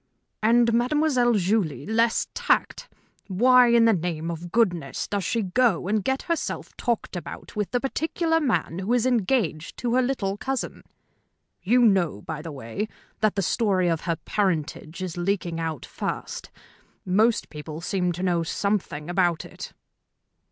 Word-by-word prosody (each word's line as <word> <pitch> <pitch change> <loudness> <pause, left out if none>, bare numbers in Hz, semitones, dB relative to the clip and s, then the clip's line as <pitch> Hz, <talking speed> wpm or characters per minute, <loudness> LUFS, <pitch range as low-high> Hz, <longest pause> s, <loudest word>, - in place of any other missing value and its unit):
"And 230 +1 +4
Mademoiselle 250 0 +3
Julie 195 -5 0
less 225 +2 +2
tact. - - 0 0.4
Why, 250 +6 +5
in 235 -1 +5
the 225 - +5
name 170 -2 -2
of 170 +1 -7
goodness, 175 -11 0
does 200 -2 -2
she 230 +5 0
go 195 -1 +2
and 210 0 +1
get 265 +4 -1
herself 335 -1 -3
talked 235 -5 -2
about 175 - -8
with 210 -2 -1
the 245 - 0
particular 325 +5 0
man 225 - 0
who 190 +4 -2
is 245 -1 +2
engaged 220 - 0
to 240 -1 -1
her 255 - +4
little 220 -7 -1
cousin? 265 +4 -3 0.8
You 245 +6 +3
know, 185 - +3
by 155 -2 -5
the 165 - -7
way, 135 - -4 0.3
that 215 -1 +2
the 195 - 0
story 185 -2 +2
of 165 -2 0
her 170 -2 -1
parentage 170 -3 -2
is 180 -2 -5
leaking 175 -2 -1
out 160 -4 -3
fast? - - -5 0.6
Most 215 +5 +2
people 150 0 -7
seem 180 +1 -1
to 175 +2 -5
know 175 -2 +2
something 165 -4 -2
about 175 -2 +1
it." - - -9
200 Hz, 155 wpm, -25 LUFS, 170-235 Hz, 0.8 s, Why